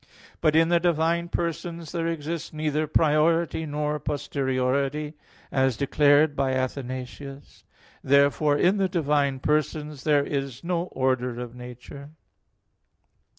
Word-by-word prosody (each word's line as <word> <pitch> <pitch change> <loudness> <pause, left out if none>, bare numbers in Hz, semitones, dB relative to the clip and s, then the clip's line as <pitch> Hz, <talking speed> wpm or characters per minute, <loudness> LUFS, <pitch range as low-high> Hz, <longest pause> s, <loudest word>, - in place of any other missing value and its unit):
But 155 -1 +3
in 165 +1 +4
the 175 0 +4
divine 170 0 +1
persons 170 -1 -4
there 165 -2 -2
exists 165 0 -4
neither 155 0 -1
priority 160 +2 +2
nor 150 0 -2
posteriority, 140 +1 -1 0.4
as 130 -3 +1
declared 145 +1 +3
by 135 -1 0
Athanasius. 130 +1 -5 0.4
Therefore, 140 +2 +3
in 185 +6 +3
the 190 -1 +1
divine 145 -5 +1
persons 150 -1 -1
there 145 -2 +3
is 135 -2 -4
no 170 0 -1
order 130 -5 -1
of 120 -1 -6
nature. 125 +3 -10
150 Hz, 115 wpm, -25 LUFS, 135-160 Hz, 0.4 s, in